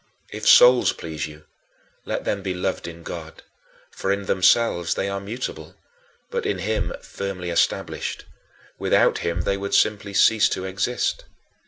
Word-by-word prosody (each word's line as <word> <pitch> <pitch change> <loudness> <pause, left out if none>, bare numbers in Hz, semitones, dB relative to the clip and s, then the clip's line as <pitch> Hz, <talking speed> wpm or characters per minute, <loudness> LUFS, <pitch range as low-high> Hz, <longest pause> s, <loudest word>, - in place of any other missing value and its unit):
If - - -4
souls 125 0 +7
please 80 -2 -5
you, 75 0 -14 0.6
let - - -3
them 100 - -2
be 95 -1 -3
loved 95 0 -3
in 85 0 -10
God; 80 -2 -8 0.5
for 95 - -2
in 100 0 -1
themselves 95 -2 +2
they 95 - -1
are 100 0 -3
mutable, 110 +6 -6 0.6
but 475 -1 -2
in 410 - -1
him - - -2
firmly 90 - -5
established 85 - -1 0.5
without - - +3
him 85 +1 -2
they 100 +3 0
would 100 0 -2
simply 100 -1 +1
cease 105 0 +5
to 95 - -3
exist. 100 +6 -2
100 Hz, 150 wpm, -23 LUFS, 85-105 Hz, 0.6 s, souls